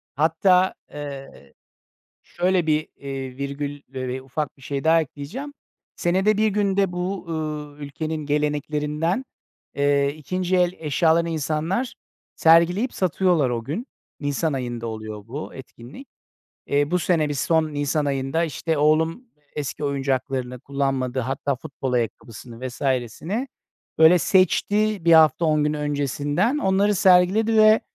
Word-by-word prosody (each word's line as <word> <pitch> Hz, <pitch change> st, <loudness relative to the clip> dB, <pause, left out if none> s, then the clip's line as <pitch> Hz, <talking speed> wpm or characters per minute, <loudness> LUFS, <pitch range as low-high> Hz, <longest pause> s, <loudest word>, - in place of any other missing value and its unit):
Hatta, 180 Hz, +5 st, +3 dB, 0.2 s
ııı, 140 Hz, -, -8 dB, 0.8 s
şöyle 180 Hz, -1 st, 0 dB
bir, 155 Hz, 0 st, +1 dB
iii, 135 Hz, -2 st, -6 dB
virgül 140 Hz, +1 st, -4 dB
ve 130 Hz, -1 st, -4 dB
ufak 140 Hz, +3 st, -4 dB
bir -, -, -21 dB
şey 135 Hz, +1 st, -4 dB
daha 165 Hz, +1 st, +5 dB
ekleyeceğim. 160 Hz, -, -7 dB, 0.4 s
Senede 190 Hz, +4 st, +2 dB
1 220 Hz, -, +3 dB
günde 200 Hz, -2 st, +1 dB
bu, 180 Hz, +2 st, -3 dB
ııı, 150 Hz, -2 st, -4 dB
ülkenin 155 Hz, +2 st, -5 dB
geleneklerinden, 150 Hz, -, -1 dB, 0.5 s
eee, 140 Hz, 0 st, +2 dB
ikinci 185 Hz, +5 st, -2 dB
el 180 Hz, 0 st, +2 dB
eşyalarını 165 Hz, +2 st, +2 dB
insanlar 160 Hz, -, -1 dB, 0.4 s
sergileyip 170 Hz, +9 st, +4 dB
satıyorlar 180 Hz, -5 st, +1 dB
o 120 Hz, -1 st, -2 dB
gün. 200 Hz, -, -4 dB, 0.3 s
Nisan 145 Hz, +2 st, -1 dB
ayında 120 Hz, -3 st, -4 dB
oluyor 110 Hz, -1 st, -7 dB
bu 140 Hz, +6 st, -6 dB
etkinlik. 130 Hz, -, -12 dB, 0.6 s
Eee, 145 Hz, +1 st, +1 dB
bu 180 Hz, -, +2 dB
sene 160 Hz, -3 st, +1 dB
bir 145 Hz, -, -2 dB
son 155 Hz, +2 st, +1 dB
nisan 145 Hz, +1 st, 0 dB
ayında 140 Hz, +3 st, 0 dB
işte 160 Hz, +1 st, -2 dB
oğlum 160 Hz, -, +2 dB, 0.3 s
eski 145 Hz, 0 st, -4 dB
oyuncaklarını 135 Hz, -2 st, -2 dB
kullanmadı, 135 Hz, -2 st, -1 dB
hatta 135 Hz, +2 st, -2 dB
futbol 135 Hz, 0 st, -5 dB
ayakkabısını 120 Hz, +1 st, -4 dB
vs.sini 135 Hz, -, -2 dB, 0.5 s
böyle 160 Hz, +3 st, +7 dB
seçti 200 Hz, +3 st, +2 dB
bir 170 Hz, -, +5 dB
hafta 160 Hz, 0 st, +6 dB
on 155 Hz, -2 st, +2 dB
gün 150 Hz, -, +1 dB
öncesinden. 145 Hz, -, 0 dB
Onları 200 Hz, -3 st, +2 dB
sergiledi 195 Hz, +4 st, +4 dB
ve, 215 Hz, 0 st, +6 dB
150 Hz, 125 wpm, -23 LUFS, 140-180 Hz, 0.8 s, böyle